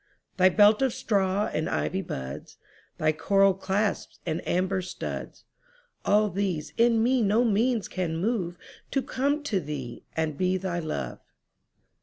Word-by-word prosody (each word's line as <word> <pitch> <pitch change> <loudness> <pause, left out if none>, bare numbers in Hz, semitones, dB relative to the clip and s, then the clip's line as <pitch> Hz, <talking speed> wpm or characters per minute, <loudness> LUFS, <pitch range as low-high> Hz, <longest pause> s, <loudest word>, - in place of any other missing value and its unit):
Thy 185 0 +6
belt 210 +4 +5
of 265 -3 +2
straw 200 -1 +1
and 155 - -1
ivy 190 +2 -1
buds, 70 - -7 0.4
Thy 155 0 +2
coral 195 +5 +3
clasps 195 +2 -1
and 165 -1 -2
amber 185 +1 +1
studs,—All 215 - -3
these 185 -5 -2
in 230 -1 +4
me 255 +1 +3
no 220 +3 +3
means 225 0 +1
can 175 -4 -2
moveTo 195 +5 -3
come 285 +3 0
to 215 -9 0
thee 145 -6 -6
and 160 -3 -1
be 185 0 +2
thy 180 -2 -2
Love. 155 - -4
195 Hz, 135 wpm, -27 LUFS, 175-220 Hz, 0.4 s, Thy